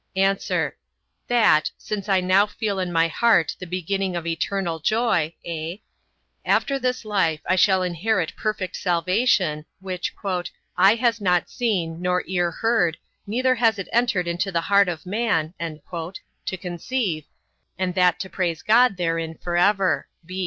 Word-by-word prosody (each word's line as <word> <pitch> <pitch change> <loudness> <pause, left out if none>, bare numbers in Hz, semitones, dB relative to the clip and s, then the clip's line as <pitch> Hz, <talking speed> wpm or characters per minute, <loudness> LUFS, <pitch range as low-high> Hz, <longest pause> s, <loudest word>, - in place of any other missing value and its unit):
A. 195 +1 +1 0.6
That 220 -10 +4
since 210 -1 -5
I 190 -1 +3
now 190 +3 +4
feel 205 -2 -3
in 180 -1 -2
my 165 -1 +3
heart 180 -1 +2
the 185 - -7
beginning 185 +1 -2
of 170 -1 -3
eternal 170 +1 -2
joy, 175 -4 +1
(a) 165 +3 -5 0.6
after 275 -1 +1
this 250 -2 -1
life, 190 -7 +1
I 185 - +2
shall 185 0 +4
inherit 180 0 -1
perfect 215 -4 -3
salvation, 180 -2 +1 0.2
which 185 -2 -4 0.6
"eye 195 +4 +6
has 230 -2 +1
not 180 -3 +1
seen, 175 -9 -1
nor 180 0 +1
ear 175 -2 0
heard, 175 -3 +1 0.3
neither 255 +5 +2
has 225 -3 +2
it 195 - -6
entered 225 -7 +2
into 175 +3 -1
the 170 -2 0
heart 200 +2 +4
of 170 0 -5
man" 185 -6 0
to 170 +3 -7
conceive, 175 - -3 0.5
and 185 0 -1
that 180 -1 +3
to 190 - -4
praise 175 -4 -2
God 235 -2 +4
therein 165 -2 -2
for 175 -1 -4
ever. 195 +1 +2
185 Hz, 145 wpm, -23 LUFS, 170-210 Hz, 0.6 s, eye